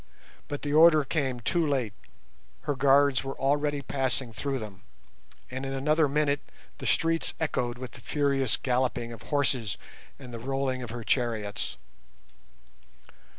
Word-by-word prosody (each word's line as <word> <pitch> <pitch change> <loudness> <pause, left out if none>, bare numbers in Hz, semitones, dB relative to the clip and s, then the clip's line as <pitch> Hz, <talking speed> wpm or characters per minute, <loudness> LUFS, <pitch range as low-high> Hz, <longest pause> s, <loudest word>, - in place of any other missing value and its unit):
But 145 - -5
the 145 0 -1
order 155 -1 +7
came 135 -4 -1
too 170 +7 +1
late, 130 -7 0 0.7
her 145 - -1
guards 140 0 +4
were 135 0 -5
already 145 +1 +1
passing 130 -3 -1
through 135 +4 -2
them, 105 -5 -8 0.7
and 130 +1 -4
in 135 0 -3
another 150 +3 +2
minute 145 0 +2 0.4
the - - -3
streets 165 +2 +2
echoed 125 -6 -1
with 125 -2 -7
the 125 - -12
furious 140 -4 +1
galloping 125 -2 0
of 115 - -11
horses 130 -5 0 0.4
and 125 -3 -10
the 115 - -5
rolling 135 +1 -1
of 120 - -6
her 120 0 -5
chariots. 110 -5 -1
135 Hz, 145 wpm, -28 LUFS, 120-145 Hz, 0.7 s, order